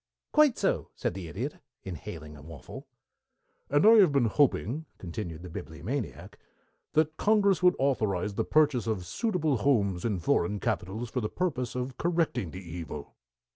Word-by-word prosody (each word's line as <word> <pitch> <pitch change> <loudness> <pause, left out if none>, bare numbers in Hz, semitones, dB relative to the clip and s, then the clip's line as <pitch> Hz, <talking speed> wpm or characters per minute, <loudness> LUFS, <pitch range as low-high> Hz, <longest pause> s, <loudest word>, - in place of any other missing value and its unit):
"Quite 300 -5 +5
so," - - 0
said - - -2
the 90 -2 -6
Idiot, 120 - -4 0.3
inhaling 80 -4 -7
a 75 - -12
waffle. 80 0 -10 0.8
"And 145 +5 +3
I 225 +1 +9
have 190 -7 +7
been 140 -4 +3
hoping," 140 +3 +1
continued 85 -2 -6
the 90 - -8
Bibliomaniac, 120 - -5 0.5
"that 155 0 +2
Congress 205 -3 +3
would 180 0 +5
authorize 105 -8 0
the - - 0
purchase 145 -7 +2
of 100 -5 -1
suitable 160 - 0
houses 100 -8 +1
in 110 -4 0
foreign 85 +3 +1
capitals 110 +6 -2
for 125 - -1
the 105 - -2
purpose 135 -10 -2
of 125 0 -4
correcting 165 - 0
the 90 +1 -9
evil." 80 -3 -7
120 Hz, 155 wpm, -29 LUFS, 90-155 Hz, 0.8 s, I